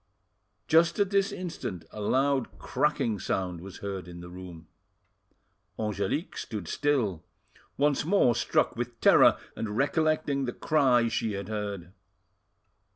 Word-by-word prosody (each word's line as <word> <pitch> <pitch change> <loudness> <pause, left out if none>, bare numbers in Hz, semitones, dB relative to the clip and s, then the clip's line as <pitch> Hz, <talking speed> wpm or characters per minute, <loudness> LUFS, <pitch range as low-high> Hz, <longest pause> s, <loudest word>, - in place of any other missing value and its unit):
Just 165 +1 +4
at 200 -2 +1
this 200 -1 +2
instant 115 - -5
a 105 - -7
loud 135 +4 +1
cracking 135 -8 0
sound 90 -3 -2
was 95 0 -10
heard 95 -2 -4
in 85 0 -9
the 85 0 -9
room. 90 -3 -10 1.1
Angelique 105 - -2
stood 105 -7 -5
still, 120 - 0 0.5
once 145 0 +2
more 165 -7 +4
struck 120 - +1
with 120 0 -5
terror, - - +6 0.2
and 110 -1 -4
recollecting 150 -1 +1
the 120 - -3
cry 130 -6 +3
she 110 -1 -1
had 100 +1 -5
heard. 100 -4 -4
115 Hz, 130 wpm, -28 LUFS, 95-145 Hz, 1.1 s, terror